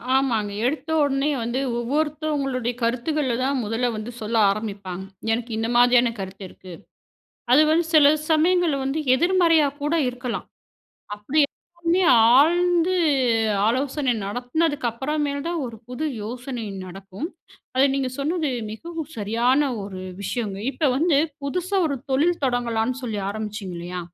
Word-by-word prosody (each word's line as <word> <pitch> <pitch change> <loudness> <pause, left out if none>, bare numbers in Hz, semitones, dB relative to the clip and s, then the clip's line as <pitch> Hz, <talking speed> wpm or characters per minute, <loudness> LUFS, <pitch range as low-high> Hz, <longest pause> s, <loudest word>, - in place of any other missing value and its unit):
ஆமாங்க. 230 -6 +1
எடுத்த 285 +3 -2
உடனே 275 +1 +1
வந்து 240 +3 -2 0.2
ஒவ்வொருத்தவங்களுடைய 280 -2 -1
கருத்துக்கள்ல 255 +3 0
தான் 275 +1 0
முதல்ல 225 +3 -1
வந்து 215 +3 -5
சொல்ல 220 +2 -3
ஆரமிப்பாங்க. 200 -3 -4 0.3
எனக்கு 235 +1 -2
இந்த 225 +1 -1
மாதிரியான 245 0 +5
கருத்து 195 +1 -7
இருக்கு. 185 0 -12 0.8
அது 295 +4 +7
வந்து 335 +2 +3
சில 295 -1 +7 0.2
சமயங்கள்ல 330 0 +3
வந்து 270 +3 -1 0.2
எதிர்மறையா 335 0 +4 0.2
கூட 295 +3 0
இருக்கலாம். 250 -1 -4 0.7
அப்டி 210 +9 0
எல்லாமே 345 +4 -2 0.4
ஆழ்ந்து 350 +3 +3 0.7
ஆலோசனை 260 +2 0
நடத்துனதுக்கு 250 +5 -1
அப்பறமேல் 285 +3 -2
தான் 340 -1 -2
ஒரு 235 -2 -8
புது 250 +5 -4 0.2
யோசனை 245 +2 -5 0.2
நடக்கும். 195 - -7 0.5
அத 260 - +5
நீங்க 270 -2 -1
சொன்னது 310 +2 -1 0.2
மிகவும் 320 +6 -7
சரியான 240 +7 +2
ஒரு 195 -2 -7 0.2
விஷயங்க. 205 -1 -3
இப்ப 295 +1 0
வந்து, 310 0 +3 0.3
புதுசா 360 +7 -1
ஒரு 280 -3 -1
தொழில் 320 +6 +2
தொடங்கலான்னு 245 0 0
சொல்லி 225 -4 -3
ஆரமிச்சிங்க 210 -2 -5
இல்லயா? 180 +1 -5
260 Hz, 125 wpm, -23 LUFS, 225-310 Hz, 0.8 s, அது